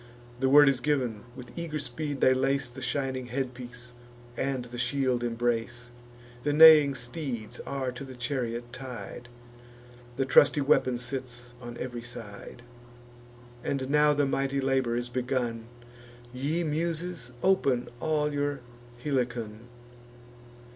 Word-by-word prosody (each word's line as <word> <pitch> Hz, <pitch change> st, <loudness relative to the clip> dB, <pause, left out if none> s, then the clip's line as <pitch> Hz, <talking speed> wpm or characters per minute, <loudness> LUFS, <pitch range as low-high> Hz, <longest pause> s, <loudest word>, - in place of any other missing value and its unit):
The 130 Hz, 0 st, +2 dB
word 145 Hz, +1 st, +8 dB
is 135 Hz, -2 st, +3 dB
giv'n; 125 Hz, -6 st, 0 dB, 0.2 s
with 125 Hz, -2 st, -10 dB
eager 170 Hz, -3 st, -3 dB
speed 145 Hz, +1 st, -4 dB
they 130 Hz, -, +6 dB
lace 135 Hz, -1 st, 0 dB
The -, -, -9 dB
shining 130 Hz, -3 st, -2 dB
headpiece, 125 Hz, -2 st, -5 dB, 0.4 s
and 130 Hz, -1 st, -2 dB
the 120 Hz, 0 st, -8 dB
shield 125 Hz, -1 st, +1 dB
embrace. 120 Hz, 0 st, -2 dB, 0.5 s
The 145 Hz, -, +1 dB
neighing 150 Hz, -3 st, +9 dB
steeds 120 Hz, -2 st, -4 dB
are 135 Hz, -2 st, -2 dB
to 125 Hz, +2 st, -8 dB
the 130 Hz, -1 st, -9 dB
chariot 120 Hz, -2 st, -3 dB
tied; 120 Hz, -2 st, -8 dB, 0.9 s
The 135 Hz, +1 st, 0 dB
trusty 140 Hz, +2 st, +5 dB
weapon 130 Hz, -2 st, +3 dB
sits 125 Hz, -1 st, -6 dB
on 120 Hz, -1 st, -8 dB
ev'ry 120 Hz, -2 st, -5 dB
side. 120 Hz, -1 st, -9 dB, 1.0 s
And 135 Hz, -1 st, -2 dB
now 150 Hz, 0 st, +5 dB
the 145 Hz, 0 st, +2 dB
mighty 135 Hz, 0 st, 0 dB
labour 130 Hz, -3 st, +1 dB
is 120 Hz, 0 st, -2 dB
begun 120 Hz, -2 st, -2 dB, 0.7 s
Ye 145 Hz, +7 st, -1 dB
Muses, 165 Hz, -1 st, -2 dB
open 140 Hz, -10 st, +2 dB
all 150 Hz, -1 st, 0 dB
your 145 Hz, 0 st, -1 dB, 0.4 s
Helicon. 120 Hz, -5 st, -2 dB
130 Hz, 125 wpm, -28 LUFS, 120-140 Hz, 1.0 s, neighing